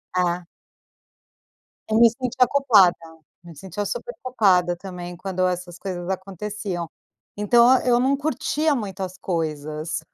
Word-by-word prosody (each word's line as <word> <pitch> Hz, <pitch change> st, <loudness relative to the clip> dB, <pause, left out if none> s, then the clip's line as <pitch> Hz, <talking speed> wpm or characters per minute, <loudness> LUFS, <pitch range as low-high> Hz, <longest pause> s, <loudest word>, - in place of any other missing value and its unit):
É. 180 Hz, 0 st, 0 dB, 1.5 s
Eu 220 Hz, -, +3 dB
me 235 Hz, 0 st, +8 dB
sentia 250 Hz, +1 st, +1 dB
culpada, 220 Hz, -10 st, +5 dB, 0.5 s
me 170 Hz, -2 st, -12 dB
sentia 190 Hz, +5 st, -5 dB
super 345 Hz, -, -4 dB
culpada 190 Hz, -8 st, +2 dB
também 175 Hz, -1 st, -8 dB
quando 185 Hz, 0 st, -1 dB
essas 180 Hz, -1 st, -4 dB
coisas 180 Hz, -3 st, -5 dB
aconteciam, 190 Hz, -1 st, -4 dB, 0.5 s
então 235 Hz, +5 st, +5 dB
eu 240 Hz, -1 st, +3 dB
não 265 Hz, +3 st, +2 dB
curtia 300 Hz, +2 st, 0 dB
muito 200 Hz, -6 st, -5 dB
as 185 Hz, -1 st, -5 dB
coisas, 155 Hz, -2 st, -3 dB
190 Hz, 125 wpm, -23 LUFS, 175-235 Hz, 1.5 s, me